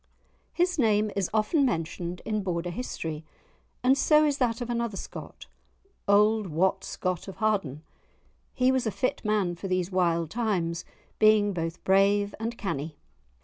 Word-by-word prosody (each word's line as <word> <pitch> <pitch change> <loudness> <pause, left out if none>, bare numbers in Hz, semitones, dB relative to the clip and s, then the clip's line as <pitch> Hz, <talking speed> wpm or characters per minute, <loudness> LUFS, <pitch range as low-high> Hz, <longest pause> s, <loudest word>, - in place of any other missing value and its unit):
His 355 -1 0
name 215 -3 +3
is 195 -3 0
often 220 +8 +2
mentioned 175 -5 -2
in 215 -1 -1
Border 175 -2 -2
history, 165 -8 -5 0.6
and 260 +2 +5
so 305 +2 +4
is 290 -1 0
that 235 -2 +1
of 240 - -4
another 235 -4 -2
Scott, - - -8 0.6
"auld 210 +1 +4
Wat 185 +4 +1
Scott 185 -2 -3
of 195 - -7
Harden." 195 -10 -1 0.7
He 255 0 +3
was 260 -3 0
a - - +2
fit 255 +5 -2
man 210 -5 +1
for 175 +3 -6
these 185 0 -1
wild 170 -3 +1
times, 185 -8 -1 0.3
being 215 -1 +5
both 165 -1 -4
brave 200 +1 +3
and 230 +1 -3
canny. 155 - -4
205 Hz, 150 wpm, -27 LUFS, 175-230 Hz, 0.7 s, and